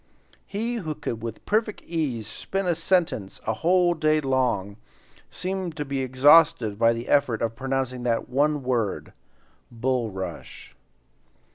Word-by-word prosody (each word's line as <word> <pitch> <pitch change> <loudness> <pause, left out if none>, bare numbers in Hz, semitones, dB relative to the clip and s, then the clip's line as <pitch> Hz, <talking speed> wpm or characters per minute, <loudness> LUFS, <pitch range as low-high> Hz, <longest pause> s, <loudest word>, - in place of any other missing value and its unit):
He 230 +4 -2
who 160 -8 -4
could 120 -7 -5
with 115 -1 -7
perfect 215 0 0
ease 145 -10 -2
spin 195 - -4
a 175 - +2
sentence 165 - 0
a 110 - 0
whole 175 +8 +3
day 155 -1 +2
long, 125 -8 0 0.5
seemed 185 -3 -4
to 150 - -3
be 140 -1 -3
exhausted 130 -4 +4
by 115 0 +5
the 115 +1 -6
effort 135 -6 +2
of 115 0 -2
pronouncing 130 -1 -2
that 120 -2 -1
one 145 +2 +1
word, 120 -6 -1 0.6
"bulrush." 115 -5 -4
135 Hz, 135 wpm, -25 LUFS, 115-165 Hz, 0.6 s, by